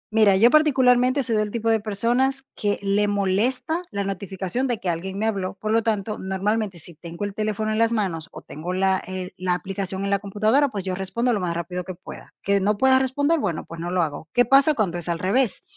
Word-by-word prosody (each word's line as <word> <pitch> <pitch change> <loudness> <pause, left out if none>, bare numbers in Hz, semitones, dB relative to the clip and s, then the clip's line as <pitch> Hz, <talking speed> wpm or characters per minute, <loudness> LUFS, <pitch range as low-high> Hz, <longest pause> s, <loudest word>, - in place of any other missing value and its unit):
Mira, 215 -3 +5
yo 225 +5 +6
particularmente 260 -3 +4
soy 230 -3 +1
del 210 -1 0
tipo 230 0 -1
de 225 -1 +3
personas 240 +6 0
que 205 -1 -1
le 200 +1 +1
molesta 225 - 0
la 200 -1 -2
notificación 195 +5 -2
de 240 -2 0
que 190 - -3
alguien 185 +3 -3
me 215 - -1
habló, 195 -4 -1
por 215 +2 -4
lo 225 +1 +3
tanto, 215 -1 -1
normalmente, 190 0 -2
si 170 +2 -12
tengo 170 +4 -8
el 205 -1 -3
teléfono 215 +1 -2
en 215 - -1
las 230 +1 +2
manos 180 -7 -2
o - - -9
tengo 165 +5 -6
la, 190 0 +1
eh, 185 -1 -5
la 185 -1 0
aplicación 190 +1 -3
en 200 - -1
la 200 0 +2
computadora, 215 +8 +2
pues 205 -7 -5
yo 185 -1 -2
respondo 215 +6 -1
lo 215 - 0
más 180 -2 -2
rápido 180 +1 -4
que 185 - -6
pueda. 180 - -12
Que 200 0 +3
no 205 +2 +1
pueda 260 +3 +5
responder, 285 +5 +1
bueno, 180 - -2
pues 165 - -10
no 170 +1 -4
lo 180 0 +1
hago. 155 -1 -3
¿Qué 245 - +5
pasa 275 +5 +5
cuando 195 - -1
es 175 - -6
al 170 -1 -1
revés? 205 +7 +1
205 Hz, 230 wpm, -23 LUFS, 185-230 Hz, -, yo